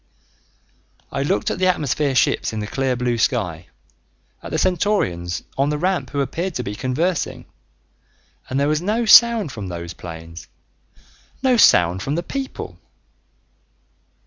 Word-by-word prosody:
I 135 - -2
looked 135 -7 0
at - - -4
the 185 - +3
atmosphere 150 -5 0
ships 120 - +2
in 110 - -3
the 105 - -3
clear 130 +3 -1
blue 120 -1 -1
sky, 90 -10 -1 0.7
at - - -8
the - - -2
Centaurians 160 - 0 0.2
on 140 +1 +2
the 150 - -1
ramp 185 +3 -1
who 140 - -1
appeared 165 +6 -3
to 125 - -2
be 100 - -4
conversing 150 - -2 1.0
and 130 - -1
there 140 - +2
was 155 +1 +1
no 215 +5 0
sound 225 - +6
from 105 -6 -6
those 85 -1 -6
planes, 80 -1 -10 1.0
no 260 -2 +4
sound 90 - +5
from 140 +8 -2
the 170 - -2
people! 270 +4 -6
135 Hz, 145 wpm, -21 LUFS, -, 1.0 s, sound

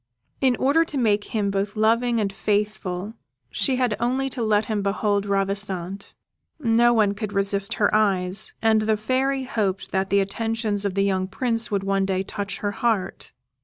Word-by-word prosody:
In 260 -2 +3
order 285 +7 +3
to 305 -3 -6
make 210 -4 +2
him 205 -3 -1
both 200 +1 -2
loving 230 +2 +2
and 200 -2 -1
faithful 205 -1 -2 0.4
she 265 - +1
had 250 -4 +1
only 260 +3 0
to 250 - -4
let 215 -1 +2
him 215 -3 -2
behold 200 0 0
Ravissante. 195 -1 -2 0.4
No 235 -3 +3
one 215 -4 +3
could 205 0 -5
resist 200 0 +1
her 205 - +1
eyes, 195 -2 +2
and 220 -1 +4
the 215 0 +1
Fairy 260 +5 0
hoped 200 -7 -2
that 190 0 0
the 200 - +3
attentions 215 +1 -2
of 195 -2 -1
the 195 - +2
young 190 -1 0
Prince 230 +3 0
would 200 -3 -1
one 195 0 0
day 190 -1 0
touch 200 0 -5
her 205 - -1
heart. 215 -2 -2
210 Hz, 175 wpm, -23 LUFS, 195-230 Hz, 0.4 s, and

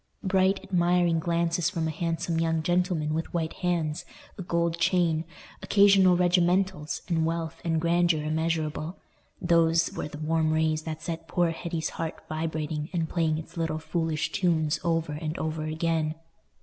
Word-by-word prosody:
Bright, 190 0 +2
admiring 175 -2 +2
glances 170 0 0
from 165 -4 -2
a - - -1
handsome 165 +1 -2
young 165 -1 0
gentleman 175 -3 +1
with 160 +1 -3
white 160 -2 -1
hands, 165 -4 0 0.3
a - - -7
gold 170 -1 -1
chain, 170 -2 +2 0.4
occasional 195 -3 +5
regimentals, 180 -2 +1
and 165 -2 +1
wealth 165 0 -3
and 165 -1 +1
grandeur 170 -1 +2
immeasurable—those 165 +1 -1
were - - -4
the 150 - -9
warm 155 +1 +1
rays 155 0 +1
that 160 -1 -5
set 165 -1 -5
poor 175 -2 +1
Hetty's 165 -1 -3
heart 160 -1 -6
vibrating 155 -1 -3
and 165 -3 -1
playing 160 -3 +1
its 160 +2 -9
little 160 -1 -1
foolish 160 -1 -2
tunes 165 -5 +1
over 165 -2 0
and 155 +1 -4
over 155 0 -3
again. 155 0 -1
165 Hz, 150 wpm, -27 LUFS, 160-175 Hz, 0.4 s, occasional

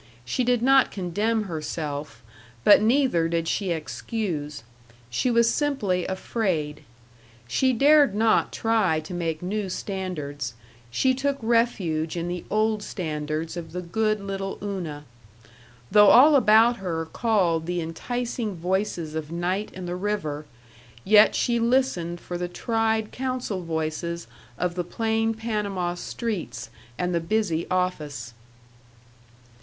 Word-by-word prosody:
She 185 - 0
did 245 -1 +1
not 270 0 +5
condemn 210 +4 -1
herself 150 - -5 0.4
but 205 - +7
neither 225 - +3
did 165 0 -1
she 195 +2 -1
excuse. 160 - -3 0.5
She 185 - +1
was 235 -1 +4
simply 210 - 0
afraid. 180 -7 -2 0.7
She 260 - +2
dared 280 -1 +5
not 220 +1 +3
try 220 -8 +1
to 155 +4 -9
make 165 -2 -2
new 200 +1 -2
standards; 150 - -4 0.3
she 260 - +2
took 280 +2 -1
refuge 200 - 0
in 170 0 -2
the 175 0 -4
old 215 0 +1
standards 155 -3 -4
of 165 -2 -7
the 180 - -3
good 215 +4 0
little 195 -1 -4
Una. 170 -8 -4 0.9
Though 210 +1 +7
all 290 +5 +8
about 230 -1 +5
her 165 -4 -3
called 170 -4 +1
the 175 0 -1
enticing 220 +6 -3
voices 175 -2 -2
of 160 -1 -5
night 180 +4 -1
and 185 -1 -6
the 175 - -3
river, 170 -7 -3 0.6
yet 210 +1 +6
she 235 -1 +1
listened 230 -9 +1
for 175 0 -6
the 175 - -2
tried 220 +3 0
counsel 255 -7 -3
voices 165 +1 -3 0.3
of 180 -1 -1
the 175 0 -2
plain 225 +4 0
Panama 205 -5 -2
streets 205 +1 -5 0.3
and 180 0 -1
the 170 - +2
busy 170 -2 -1
office. 150 -10 -2
185 Hz, 130 wpm, -25 LUFS, 165-225 Hz, 0.9 s, all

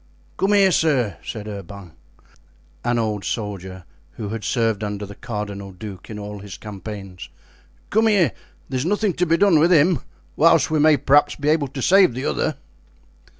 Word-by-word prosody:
"Come 195 +2 +2
here, 195 -2 +5
sir," 135 - +1
said 110 -2 -6
Urban, 100 -3 -8 0.9
an 120 0 +1
old 105 -3 -1
soldier 95 -4 -5 0.3
who 105 -3 -6
had 110 0 -5
served 115 -4 0
under 105 0 -4
the 100 - -10
cardinal 100 -2 -6
duke 95 0 -10
in 110 - -6
all 105 0 -7
his 100 -1 -9
campaigns; 100 -3 -8 0.6
"come 220 +2 +3
here, 200 -6 +3 0.4
there 130 -1 -2
is - - -1
nothing 205 0 +1
to 180 +1 0
be 165 +1 +3
done 190 -4 +4
with 170 +4 +4
him, 165 -1 +4 0.4
whilst 165 -1 +4
we 155 - +2
may 155 0 +5
perhaps 145 +2 +3
be 145 +1 -1
able 155 -2 +2
to 135 -1 -6
save 185 -9 +5
the 130 - -4
other." 75 -5 -1
115 Hz, 175 wpm, -22 LUFS, 100-160 Hz, 0.9 s, here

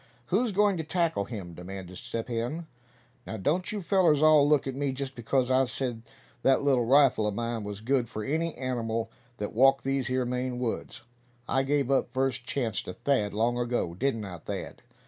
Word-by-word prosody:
"Who's 230 +3 +3
goin' 205 -1 +3
to 160 - -2
tackle 165 - 0
him?" 95 -7 -7
demanded 95 +1 -8
Step 115 -1 -5
Hen. 120 +8 -3 0.6
"Now, 110 - -4
don't 165 - 0
you 210 -2 -4
fellers 170 -6 +3
all 155 -2 +6
look 150 -2 +3
at 135 - -3
me, 140 0 -1
just 135 0 -5
because 125 +2 0
I 130 +1 +4
said 120 -2 -3 0.4
that 135 +2 +3
little 130 -4 +3
rifle 130 -4 +5
of 105 - -2
mine 115 0 -2
was 105 0 -6
good 125 0 +1
for 110 - -5
any 160 +5 -1
animal 115 -3 -2 0.3
that 105 - -4
walked 135 +3 +5
these 135 -2 0
here 130 0 0
Maine 125 0 -2
woods. 125 -2 -4 0.4
I 135 - +2
gave 140 -1 +1
up 135 - +2
first 130 -2 0
chance 120 -7 -1
to 90 - -7
Thad 110 -6 0
long 120 +3 +1
ago, 120 -8 -1
didn't 115 +2 -1
I, 90 -3 -7
Thad? - - -6
130 Hz, 190 wpm, -28 LUFS, 115-140 Hz, 0.6 s, all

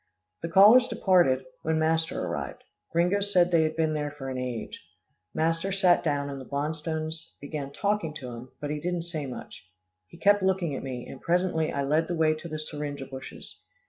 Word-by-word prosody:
The 165 - -3
callers 215 +8 +8
departed, 180 - +3 0.2
when 160 0 0
master 160 +1 +1
arrived. - - -5 0.3
Gringo 175 +4 +2
said 185 -3 +3
they 165 -2 +5
had 155 0 0
been 160 -1 +1
there 150 -1 -1
for 145 -2 -7
an 130 - -4
age. 125 -3 -5 0.5
Master 165 +4 0
sat 185 -2 +4
down, 145 -2 0
and 140 -1 -6
the 130 - -12
Bonstones 155 +2 -3
began 140 -1 -5
talking 200 -1 0
to 125 -4 -6
him, 120 +2 -9
but 145 0 -4
he 150 - -2
didn't 175 +1 -2
say 160 -4 -4
much. 125 - -9 0.4
He 170 - -15
kept 205 +2 +4
looking 190 -5 +1
at - - -4
me, 125 -2 -5
and 135 - -10
presently 175 -2 +1
I 140 - -1
led 155 +4 +2
the 175 - -2
way 160 -1 +3
to 155 +2 -8
the 155 -1 -4
syringa 145 -2 -5
bushes. 130 0 -10
160 Hz, 195 wpm, -27 LUFS, 140-175 Hz, 0.5 s, callers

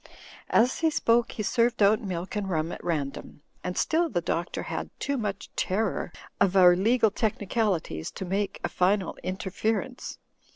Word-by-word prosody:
As 245 +3 +3
he 325 - +3
spoke, 235 -5 +2
he 215 - -3
served 230 +1 +2
out 210 +2 +5
milk 185 -2 -4
and 205 -2 -2
rum 160 -1 -1
at - - -8
random; 150 -3 -4 0.2
and 180 - -3
still 330 +1 +2
the 180 - 0
Doctor 170 0 -2
had - - -4
too 280 - -1
much 205 -5 -4
terror 195 -1 -1 0.3
of 195 -1 +3
our 180 -1 +8
legal 220 +3 +3
technicalities 205 - -1
to 190 - -5
make 195 +2 -2
a - - +1
final 190 0 +1
interference. 205 +6 -3
200 Hz, 160 wpm, -27 LUFS, 180-225 Hz, 0.3 s, our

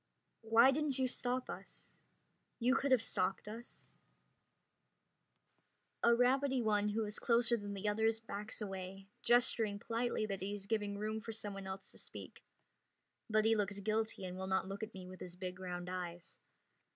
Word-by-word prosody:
"Why 230 +4 +6
didn't 285 -1 +1
you 260 -1 +2
stop 250 0 -1
us? - - -10 0.6
You 250 +2 +3
could 275 +1 +1
have 255 -4 +5
stopped 195 -2 0
us." 230 +3 -8 2.1
A 235 0 +6
rabbity 265 +2 +3
one 210 -1 +2
who 220 +1 0
is 210 0 -2
closer 235 0 +3
than 205 -2 -5
the 200 +2 -3
others 220 +2 +2
backs 215 -1 -5
away, 195 -1 -6
gesturing 235 -3 +4
politely 230 +1 -1
that 195 -3 -4
he 200 +2 -2
is 200 -1 -5
giving 205 -1 -1
room 215 +1 -2
for 225 0 -6
someone 200 -3 -4
else 190 0 -7
to - - -9
speak, - - -8 0.9
but 215 0 +3
he 225 0 +5
looks 200 -1 0
guilty 215 0 -1
and 185 0 -5
will 190 - -3
not 190 0 +1
look 195 +1 -5
at 220 -1 -5
me 185 -1 -7
with 185 0 -10
his 180 -1 -7
big 180 0 -5
round 180 -1 -4
eyes. 175 -1 -6
215 Hz, 170 wpm, -36 LUFS, 195-230 Hz, 2.1 s, Why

